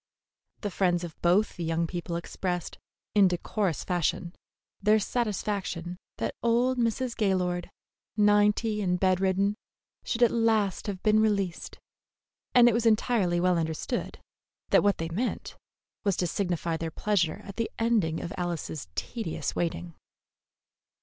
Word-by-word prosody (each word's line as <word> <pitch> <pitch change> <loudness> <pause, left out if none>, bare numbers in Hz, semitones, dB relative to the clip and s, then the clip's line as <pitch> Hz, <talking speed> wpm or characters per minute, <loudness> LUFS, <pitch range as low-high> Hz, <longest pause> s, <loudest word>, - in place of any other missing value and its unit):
The 205 - -3
friends 175 -2 +1
of 170 -2 -8
both 185 +5 +2
the 175 - -3
young 165 +1 0
people 170 0 -4
expressed, 175 +1 -4 0.3
in 200 -2 +6
decorous 180 0 -1
fashion, 175 0 -1 0.5
their 215 +1 +5
satisfaction 200 -6 -2 0.2
that - - -2
old 245 +2 +2
Mrs. 235 +1 0
Gaylord, 180 -4 0 0.5
ninety 210 +1 +3
and 180 -2 0
bed 185 -1 +3
ridden, 195 +2 +1 0.5
should 240 +1 0
at 235 - +5
last 220 -4 +1
have 190 -3 -4
been 215 0 +4
released, 200 -5 0 0.8
and 245 -1 +8
it 240 - +4
was 230 0 +2
entirely 215 -5 +2
well 180 -1 +3
understood 160 -1 -3 0.5
that - - +5
what 205 -1 +2
they 165 0 -3
meant 215 +10 -3 0.5
was 200 -3 +1
to 180 - +1
signify 175 -2 -1
their 165 0 -3
pleasure 185 0 0
at 200 -1 -10
the 230 -1 -1
ending 220 -9 +1
of 170 - -5
Alice's 170 - -3
tedious 225 -9 -3
waiting. 175 0 -2
195 Hz, 140 wpm, -28 LUFS, 175-215 Hz, 0.8 s, and